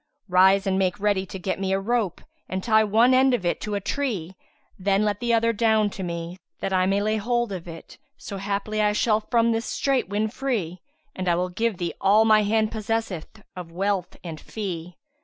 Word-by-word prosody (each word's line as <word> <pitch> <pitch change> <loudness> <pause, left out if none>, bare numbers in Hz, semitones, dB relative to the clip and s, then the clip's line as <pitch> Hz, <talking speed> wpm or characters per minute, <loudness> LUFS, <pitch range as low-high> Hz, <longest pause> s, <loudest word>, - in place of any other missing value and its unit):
Rise 190 +2 +5
and 190 -1 +1
make 185 -2 0
ready 200 -2 +1
to 190 - -7
get 190 +1 -3
me 190 -1 -1
a 195 - +1
rope 215 -3 -1 0.3
and 185 0 -3
tie 220 -1 +4
one 225 +4 +4
end 260 0 +5
of 190 - -5
it 175 - 0
to 210 -1 -3
a - - 0
tree; 200 - -3 0.4
then 200 +2 +2
let 205 -1 -1
the 240 -1 -1
other 230 0 +3
down 220 -1 +2
to 190 - -7
me, 170 0 -5 0.2
that 195 - -2
I 185 0 +3
may 200 +1 +1
lay 215 +1 +1
hold 240 +1 0
of 180 -3 -6
it, 165 -1 -11 0.2
so 200 - -7
haply 205 +2 -2
I 210 0 +3
shall 215 0 +2
from 230 +1 +2
this 225 +1 -1
my - - -3
strait 270 -7 0
win 210 +2 0
free, 215 -8 -3 0.4
and 185 -1 -2
I 170 - +3
will 180 +1 -1
give 220 +2 -1
thee 175 -1 -3
all 210 +3 +5
my 215 -1 +5
hand 215 +1 +1
possesseth 220 -3 -4
of 180 -2 -8
wealth 190 0 -2
and 165 -3 -7
fee." 180 -5 -6
205 Hz, 215 wpm, -24 LUFS, 185-220 Hz, 0.4 s, Rise